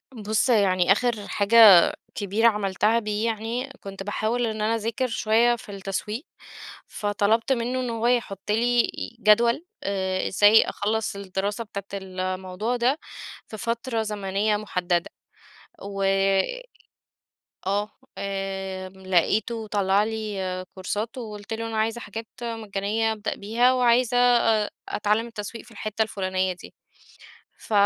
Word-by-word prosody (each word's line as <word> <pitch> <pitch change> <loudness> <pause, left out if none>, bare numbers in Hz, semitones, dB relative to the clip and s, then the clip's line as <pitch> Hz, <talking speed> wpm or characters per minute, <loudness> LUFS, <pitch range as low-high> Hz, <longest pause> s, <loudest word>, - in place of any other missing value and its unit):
بُص 215 +2 0
يعني 190 -5 +3
آخر 215 0 +1
حاجة 205 +3 +2 0.6
كبيرة 205 +3 +2
عملتها 210 +1 +2
دي 210 -1 -2
يعني، 230 +3 -2
كنت 195 0 -7
باحاول 220 +4 -1
إن 215 -1 -3
أنا 220 +2 +1
أذاكر 230 +3 -1
شوية 230 +1 +3
في 215 - -11
التسويق، 200 - -4 0.6
فطلبت 210 +4 0
منه 245 +1 -1
إن 250 -1 -2
هو 230 0 -1
يحط 210 -5 -1
لي 240 +2 +2 0.3
جدول 235 +7 +4 0.2
آآ 190 -1 -1
إزاي 205 +3 +6
أخلّص 215 0 -2
الدراسة 200 +2 -3
بتاعة 200 -3 -7 0.2
الموضوع 185 +4 -3
ده 250 +5 +1 0.5
في 215 - -8
فترة 230 +1 -2
زمنية 210 0 -1
محددة، 180 -4 -1 0.7
و 195 0 -5 1.6
آه 205 +2 0 0.3
آمم 190 -1 -5
لقيته 215 +5 +1
طلّع 200 -1 +2
لي 200 -4 -3
كورسات، 210 +5 -4
وقلت 210 -3 -7
له: 225 +1 -3
"أنا 225 - -4
عايزة 225 +2 0
حاجات 225 +1 -7 0.2
مجانيّة 220 -1 -1
أبدأ 210 -2 -3
بيها، 235 +5 +2
وعايزة 245 -1 +3
أ 235 -3 +3 0.2
أتعلّم 210 +2 0
التسويق 225 0 -7
في - - -18
الحِتة 215 0 -2
الفُلانيّة 185 -3 -1
دي." 180 - -14 0.8
ف - - -11
215 Hz, 125 wpm, -25 LUFS, 195-230 Hz, 1.6 s, إزاي